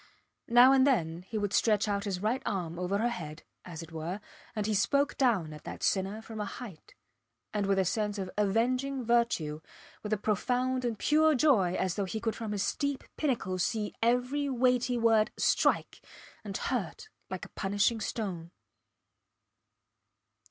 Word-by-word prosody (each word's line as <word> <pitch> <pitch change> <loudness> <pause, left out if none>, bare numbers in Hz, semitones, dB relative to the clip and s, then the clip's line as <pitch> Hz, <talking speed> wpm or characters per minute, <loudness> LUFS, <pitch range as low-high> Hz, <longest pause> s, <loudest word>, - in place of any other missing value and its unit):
Now 245 +2 +7
and 270 0 +5
then 170 - +1
he 220 - -4
would 205 -1 -1
stretch 215 -2 +3
out 200 0 -1
his 190 -1 -3
right 240 +5 +1
arm 175 -4 -3
over 180 +2 0
her 230 +3 +1
head, 155 -8 -6 0.2
as 165 -2 -8
it 165 - -12
were, 165 +4 -4 0.4
and 210 -1 -1
he 215 - 0
spoke 280 +8 +2
down 210 - +1
at 150 - -11
that - - -7
sinner 200 +3 0
from 220 -1 -8
a - - -2
height, 205 -8 -9 0.6
and 205 -2 0
with 195 0 +2
a 190 - +3
sense 210 +2 -1
of 190 -2 -4
avenging 250 +6 +1
virtue, 220 -11 +1 0.4
with 210 - -6
a 215 - +2
profound 250 +5 0
and 230 -2 -1
pure 310 +5 +4
joy 235 - +3
as 185 -2 0
though 200 - -1
he 220 +4 -4
could 225 -1 -2
from 225 -2 -5
his 205 -2 -1
steep 285 -2 -1
pinnacle 230 -11 -1
see 210 +3 -1
every 250 +5 +1
weighty 250 -1 +2
word 225 -2 +4
strike - - +1 0.4
and 200 -2 -4
hurt 460 -2 -3 0.2
like - - -5
a - - -13
punishing 205 +3 0
stone. 185 -7 -4
215 Hz, 170 wpm, -30 LUFS, 190-245 Hz, 0.6 s, Now